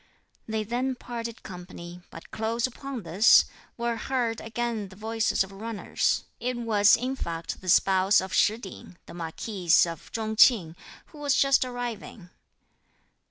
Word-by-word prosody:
They 220 -1 -2
then 250 +4 -2
parted 235 -2 -7
company, 180 -1 -10
but 165 - -12
close 225 +2 -1
upon 260 -1 -6
this, 180 +7 +6 0.3
were 235 -1 -1
heard 235 -2 -2
again 225 -2 -3
the 190 - -14
voices 220 0 0
of 190 - -11
runners. 215 +2 -1 0.2
It 250 0 -2
was, 215 -3 +4
in 255 +2 -3
fact, 165 -8 -5
the 185 - -5
spouse 190 +2 +4
of 190 0 -5
Shih 215 +1 +3
Ting, 190 -4 -11
the - - -12
marquis 175 +3 -6 0.2
of 165 -2 -8
Chung 220 -1 -3
Ching, 185 -10 +5 0.3
who 300 - -14
was 285 -3 +1
just 275 -1 +4
arriving. 240 -7 -6
220 Hz, 150 wpm, -27 LUFS, 190-240 Hz, 0.3 s, this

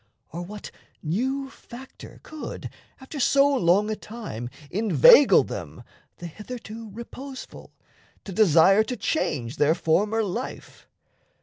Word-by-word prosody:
Or 170 - -6
what 205 +4 -9 0.3
new 265 - -2
factor 260 +2 -13
could, 310 -1 -8 0.3
After 275 +2 -8
so 275 +2 +4
long 210 -6 +2
a - - -1
time, 210 - -7 0.2
inveigle 225 - +6
them - - -8 0.3
The 175 - -9
hitherto 220 +4 -9
reposeful 255 +5 -10 0.5
to 195 - -8
desire 190 0 +5
To 250 +2 -5
change 145 - -2
their 150 +2 +3
former 205 +7 +1
life? 215 +6 -6
215 Hz, 115 wpm, -25 LUFS, 175-260 Hz, 0.5 s, inveigle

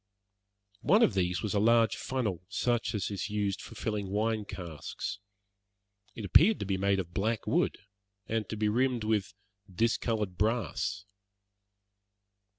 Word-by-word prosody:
One 210 +9 +5
of 120 - +4
these 90 0 0
was 105 - -1
a 105 - +2
large 115 +1 +4
funnel, 110 -10 -2
such 120 +1 0
as 105 0 -2
is 100 0 -3
used 105 -2 -1
for 115 - -10
filling 105 -2 -2
wine 110 +1 0
casks. 90 +2 -6 1.0
It 110 - -5
appeared 195 - +6
to - - -1
be 95 0 0
made 100 +1 +1
of 85 -2 -5
black 110 +2 -1
wood, - - +1 0.5
and 110 -2 -2
to 110 - -4
be 105 0 +1
rimmed 120 +2 +1
with 105 -3 0 0.4
discoloured 110 -2 0
brass. 110 -4 0
105 Hz, 145 wpm, -30 LUFS, 95-115 Hz, 1.0 s, appeared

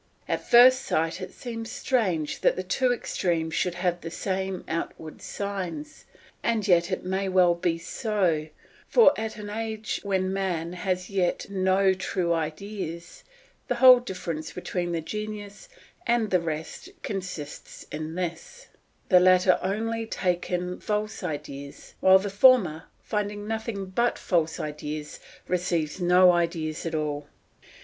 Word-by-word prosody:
At - - -3
first 255 +2 +8
sight 165 -4 -1
it 185 - -6
seems 230 -2 -6
strange 185 - 0
that - - +3
the 185 - -3
two 250 +7 +1
extremes 170 -8 -1
should 175 +2 0
have 175 -1 -1
the 165 - -5
same 190 +1 -3
outward 160 -1 -5
signs; 200 - -5 0.4
and 225 -3 0
yet 175 0 +4
it 185 - -3
may 190 +1 -1
well 180 -2 +5
be 170 -1 -1
so, 175 -5 -1 0.4
for 455 -12 +6
at 220 0 -4
an 205 -1 -7
age 220 0 -3
when 190 -2 0
man 180 -3 -2
has 185 0 -1
as 185 - -11
yet 190 0 -1
no 190 0 +3
true 185 -2 -1
ideas, 170 +1 -5 0.4
the 245 - 0
whole 255 0 +9
difference 170 -8 -5
between 180 -1 -3
the 165 -1 -1
genius 210 - -6 0.4
and 235 -3 +2
the 180 -2 +3
rest 160 - -5
consists 185 -7 -6
in 155 +1 -5
this: 180 - -5 0.4
the 180 - +7
latter 185 0 +5
only 225 +3 -2
take 180 -4 -1
in 180 0 -2
false 210 0 -2
ideas, 145 -4 -6
while 190 0 +7
the 195 +1 -3
former, 200 -7 +5 0.2
finding 205 -1 -3
nothing 220 -2 -3
but 235 +6 0
false 165 -3 0
ideas, 150 0 -5 0.3
receives 175 -2 -1
no 180 +1 +6
ideas 165 -2 -1
at 165 - -3
all. 150 -1 -2
185 Hz, 145 wpm, -26 LUFS, 170-210 Hz, 0.4 s, whole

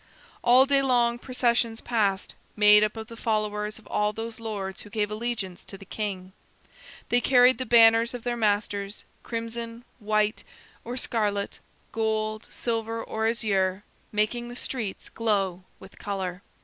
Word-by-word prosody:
All 255 +2 +7
day 275 0 +3
long 240 -3 +2
processions 235 -3 +1
passed, 205 -5 0 0.2
made 210 0 +7
up 215 +1 -1
of 220 - -5
the 230 0 -11
followers 210 -2 -1
of 220 - -17
all 210 0 0
those 225 +1 -6
lords 200 -4 -5
who 210 - -11
gave 210 -1 -1
allegiance 215 -5 -4
to 195 - -9
the 195 - -13
king. 190 -3 -5 0.8
They 245 - +3
carried 250 -1 +5
the 255 - -3
banners 230 +1 +6
of 240 - -7
their 245 -1 -1
masters, 205 -2 -1 0.2
crimson, 230 0 -5
white, 215 -1 0 0.4
or 245 +1 -5
scarlet, 205 -5 -1 0.3
gold, 215 -1 -1
silver, 225 -1 -3
or 220 0 -1
azure, 200 -4 0 0.3
making 215 +3 0
the 240 - -8
streets 230 -6 -4
glow 195 -5 -1
with 190 +1 -15
color. 190 -2 -4
220 Hz, 150 wpm, -26 LUFS, 205-235 Hz, 0.8 s, All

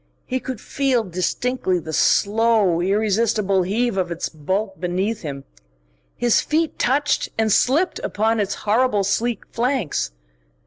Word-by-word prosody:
He 260 0 -2
could 255 -3 -6
feel 265 -3 0
distinctly 185 +3 -1
the 160 -2 -6
slow, 210 -3 +3
irresistible 205 0 +1
heave 210 +4 0
of 180 -2 0
its 170 0 -3
bulk 190 +5 -3
beneath 190 +5 -1
him. 140 -4 -6 0.7
His 240 -2 +3
feet 320 +1 -1
touched 285 +4 +1
and 220 -1 +1
slipped 305 - +2
upon 220 +2 0
its 205 -1 -1
horrible 215 -1 +2
sleek 230 +4 -1
flanks. 245 - -1
215 Hz, 130 wpm, -21 LUFS, 185-245 Hz, 0.7 s, slow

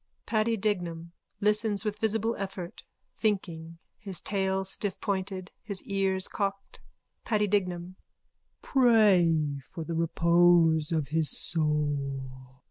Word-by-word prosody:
(Paddy 225 0 +1
Dignam 175 -5 -2 0.3
listens 210 0 +2
with 210 0 -2
visible 225 +1 0
effort, 190 -3 -6 0.4
thinking, 170 -6 -2 0.2
his 195 -5 -6
tail 190 -1 -1
stiffpointed, 190 -1 -3
his 200 -3 -3
ears 195 -1 0
cocked.) 200 -1 -4 0.4
PADDY 210 -2 +1
DIGNAM: 185 -3 -1 0.7
Pray 180 - +4
for 165 - -5
the 165 - -5
repose 165 -1 +3
of 155 -4 -1
his 160 0 +2
soul. 140 -5 -2
185 Hz, 105 wpm, -28 LUFS, 165-205 Hz, 0.7 s, Pray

